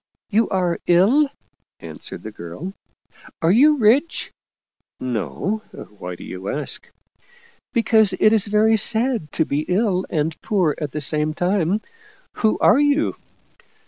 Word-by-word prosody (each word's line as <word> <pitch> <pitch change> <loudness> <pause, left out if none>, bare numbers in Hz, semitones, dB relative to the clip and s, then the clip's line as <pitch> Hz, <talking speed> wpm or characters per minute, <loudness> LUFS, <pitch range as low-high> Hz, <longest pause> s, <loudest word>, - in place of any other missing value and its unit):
" - - -72
You 220 +2 +2
are 180 -3 0
ill? 220 - +4 0.3
" - - -52
answered - - -8
the 110 - -7
girl. 105 - -8 0.3
" - - -22
Are 165 - +4
you 295 +8 +5
rich? 260 +8 +2 0.4
" - - -56
"No. 130 - -3 0.4
Why 90 0 -6
do - - -12
you 95 +2 -7
ask?" 150 +1 -4 0.4
" 470 -1 -30
Because 220 -4 +4
it 215 - +5
is 215 -2 +3
very 215 +2 +3
sad 225 - 0
to 160 - +1
be 140 - -1
ill 190 -1 0
and 160 -1 -2
poor 185 -8 +1
at 150 - -2
the 150 - -5
same 155 +1 0
time. 185 +2 0 0.6
Who 220 -1 +2
are 225 - +5
you 290 +1 +2
195 Hz, 155 wpm, -21 LUFS, 155-225 Hz, 0.6 s, you